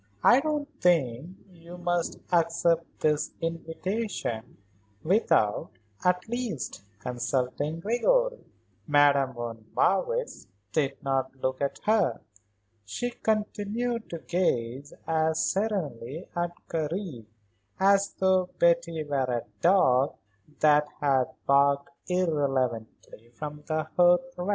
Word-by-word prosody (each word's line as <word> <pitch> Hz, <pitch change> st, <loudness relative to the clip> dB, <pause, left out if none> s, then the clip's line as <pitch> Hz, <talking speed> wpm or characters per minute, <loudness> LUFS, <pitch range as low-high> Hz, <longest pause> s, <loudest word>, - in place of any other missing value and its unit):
"I 245 Hz, -, +7 dB
don't 300 Hz, 0 st, -1 dB
think 165 Hz, -1 st, +1 dB
that 185 Hz, -3 st, -22 dB
you 170 Hz, +2 st, -11 dB
must 175 Hz, -1 st, -1 dB, 0.2 s
accept 170 Hz, 0 st, +1 dB
this 150 Hz, -1 st, +1 dB
invitation 165 Hz, -, -3 dB, 0.5 s
without, 160 Hz, -, +2 dB, 0.3 s
at 180 Hz, +1 st, +1 dB
least, 235 Hz, -, -4 dB, 0.2 s
consulting 125 Hz, +6 st, -2 dB
Gregory." -, -, +1 dB, 0.4 s
Madame 145 Hz, -2 st, +4 dB
von 115 Hz, -2 st, -6 dB
Marwitz -, -, 0 dB, 0.2 s
did 140 Hz, -1 st, 0 dB
not 135 Hz, -1 st, -1 dB
look 130 Hz, 0 st, -2 dB
at 140 Hz, -, -2 dB
her. 210 Hz, -, +2 dB, 0.6 s
She 245 Hz, -, -3 dB
continued 220 Hz, +2 st, -2 dB
to 170 Hz, -, -4 dB
gaze 140 Hz, -6 st, -1 dB
as 160 Hz, 0 st, +1 dB
serenely 165 Hz, -, -3 dB
at 175 Hz, 0 st, -1 dB
Karen 160 Hz, -, -3 dB, 0.5 s
as 200 Hz, +1 st, +3 dB
though 185 Hz, -1 st, +2 dB
Betty 170 Hz, -2 st, +2 dB
were 140 Hz, -3 st, 0 dB
a 120 Hz, -2 st, -1 dB, 0.2 s
dog 140 Hz, -7 st, +4 dB, 0.5 s
that 150 Hz, -1 st, +5 dB
had 135 Hz, -3 st, +3 dB, 0.2 s
barked 140 Hz, 0 st, +3 dB, 0.2 s
irrelevantly 135 Hz, -10 st, -1 dB
from 150 Hz, +2 st, -6 dB
the 155 Hz, -1 st, 0 dB
hearth 180 Hz, +10 st, +4 dB
rug. 180 Hz, +2 st, -4 dB
165 Hz, 110 wpm, -27 LUFS, 135-190 Hz, 0.6 s, I